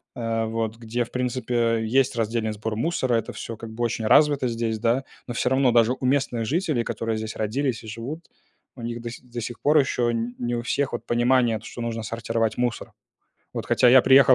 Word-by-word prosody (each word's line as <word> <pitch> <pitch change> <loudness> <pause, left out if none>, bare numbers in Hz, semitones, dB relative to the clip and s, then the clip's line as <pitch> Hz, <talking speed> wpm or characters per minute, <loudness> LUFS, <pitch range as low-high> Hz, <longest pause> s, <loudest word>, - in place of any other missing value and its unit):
а 115 -1 -1
вот, 115 0 -2
где, 120 +1 -2
в 115 - -12
принципе, 120 -2 0
есть 125 +3 +2
раздельный 110 -1 -1
сбор 110 +1 -4
мусора, 130 0 0
это 115 - -2
всё 115 - -6
как 115 0 -8
бы 115 +2 -4
очень 115 -1 -1
развито 145 +2 +5
здесь, 115 -2 -2
да, 120 +4 +1 0.2
но 120 - -4
всё 125 - +1
равно 130 -1 +3
даже 120 +1 +4
у 130 - -3
местных 130 -4 +1
жителей, 155 - 0
которые 115 -1 -2
здесь 110 0 -5
родились 120 +2 -1
и 110 - -10
живут, 125 +10 -6 0.5
у 125 - -10
них 120 0 -4
до 120 - -5
си - - -10
до 120 -1 -6
сих 120 +1 -6
пор 150 +2 +4
еще 130 -4 +2
н 115 +1 -3
не 120 0 -1
у 120 - -3
всех 135 +1 -1
вот 120 - -4
понимание 120 -1 +2
то, 105 - -15
что 120 - -7
нужно 115 -1 -3
сортировать 115 0 -1
мусор. 120 -2 -2 0.6
Вот - - -3
хотя 125 - +4
я 130 +1 +8
приехал 135 0 +7
120 Hz, 220 wpm, -24 LUFS, 115-125 Hz, 0.6 s, я